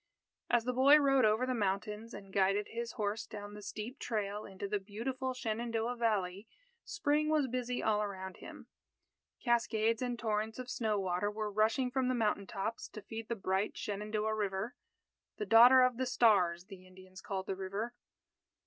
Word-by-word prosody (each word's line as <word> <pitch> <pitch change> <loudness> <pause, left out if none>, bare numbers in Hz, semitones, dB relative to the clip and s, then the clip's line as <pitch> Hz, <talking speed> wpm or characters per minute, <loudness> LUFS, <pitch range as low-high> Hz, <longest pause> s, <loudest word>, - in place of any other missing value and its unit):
As 240 -1 +3
the 250 +1 -1
boy 275 +4 +7
rode 275 -4 +4
over 215 +4 +3
the 255 - -1
mountains, 210 +1 -2
and 195 -1 -11
guided 195 +1 +2
his 235 0 -4
horse 210 +1 -2
down 205 -1 -8
the 210 - -9
steep 215 +6 -6
trail 210 -2 -3
into 195 +1 -6
the 205 +1 -1
beautiful 255 +6 -4
Shenandoah 230 0 -2
Valley, 205 -4 -1 0.4
Spring 305 -7 0
was 305 -2 +3
busy 250 0 -2
all 210 -1 +2
around 190 -2 -5
him. - - -11 0.8
Cascades 230 -2 +1
and 245 -1 -2
torrents 220 -1 -2
of 255 -1 -6
snow 215 -4 0
water 185 +1 0
were 210 0 -3
rushing 220 +5 +1
from 260 -1 0
the 255 - +1
mountain 210 -4 0
tops 210 +4 -4
to 215 - -10
feed 225 +1 -7
the 235 - 0
bright 190 0 -1
Shenandoah 210 +1 -2
River 205 +2 -2 0.6
"The 210 - -3
Daughter 245 +5 +8
of 250 -2 +2
the 260 0 -1
Stars," 190 -8 +3
the 185 -1 -12
Indians 185 0 -14
called 190 -1 -4
the 195 - -3
river. 195 +5 -4
215 Hz, 175 wpm, -33 LUFS, 200-245 Hz, 0.8 s, Daughter